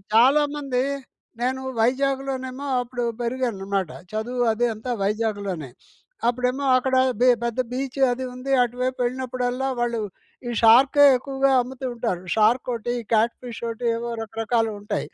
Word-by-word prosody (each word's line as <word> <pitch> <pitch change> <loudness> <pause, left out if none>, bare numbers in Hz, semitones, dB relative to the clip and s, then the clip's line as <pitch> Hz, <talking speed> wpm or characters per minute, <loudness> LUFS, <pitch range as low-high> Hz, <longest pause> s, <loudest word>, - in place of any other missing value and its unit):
చాలామంది 275 +1 +3 0.6
నేను 260 +2 0 0.2
వైజాగ్‍లోనేమో 265 +1 -1
అప్పుడు 245 0 -4 0.2
పెరిగాననమాట. 200 -7 -2 0.2
చదువు 245 +3 -1
అది 240 +2 +1
అంతా 245 +3 -4
వైజాగ్‍లోనే. 200 - -2 0.6
అప్పుడేమో 250 +3 0
అక్కడ 260 +1 0 0.3
బె 250 - +5 0.2
పెద్ద 235 +1 -2
బీచ్ 265 +1 -4
అది 255 +1 -3
ఉంది. 255 +2 -5
అటువైపు 250 +1 -2
వెళ్ళినప్పుడల్లా 255 +1 -2
వాళ్ళు 235 -1 0 0.5
ఈ - - -2
షార్కే 265 +6 +7
ఎక్కువగా 270 +1 0
అమ్ముతూ 260 +1 -7
ఉంటారు. 230 -7 -2
షార్క్ 225 +4 +3
ఒకటి, 235 +1 -3 0.2
క్యాట్ 225 +2 +3
ఫిష్ 240 -2 -7
ఒకటి 230 +1 -5
ఏవో 235 +1 -4
రకరకాలు 225 +1 -1
ఉంటాయి. 205 - -3
245 Hz, 125 wpm, -24 LUFS, 225-260 Hz, 0.6 s, షార్కే